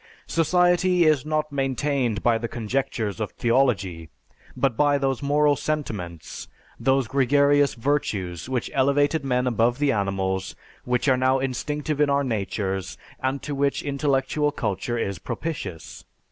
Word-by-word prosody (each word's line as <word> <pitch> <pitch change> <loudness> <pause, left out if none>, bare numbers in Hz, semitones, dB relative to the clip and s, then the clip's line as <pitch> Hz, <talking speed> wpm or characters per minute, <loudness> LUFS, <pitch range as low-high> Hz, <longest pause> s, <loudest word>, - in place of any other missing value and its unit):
Society 180 +2 +3
is 150 -2 +3
not 155 -1 -1
maintained 135 -4 -1
by 115 -2 +3
the 115 - -3
conjectures 115 -3 -2
of 110 - -3
theology, 100 -10 0 0.5
but 130 -2 +1
by 145 +2 +3
those 135 -2 -1
moral 145 +1 +3
sentiments, 105 - -4 0.3
those 135 -2 +2
gregarious 140 +2 +3
virtues 110 - -2
which 125 -3 -2
elevated 145 +3 +2
men 125 -2 0
above 120 0 +2
the 145 -1 +2
animals, 95 -3 -1 0.3
which 125 +2 0
are 130 -2 +4
now 130 +1 +3
instinctive 145 +3 -2
in 145 - +4
our 140 0 +2
natures 100 -5 -3 0.2
and 130 +1 -2
to 150 - -4
which 140 0 0
intellectual 140 +1 0
culture 105 -2 -2
is 100 -5 -2
propitious. 145 - -6
135 Hz, 135 wpm, -24 LUFS, 115-145 Hz, 0.5 s, are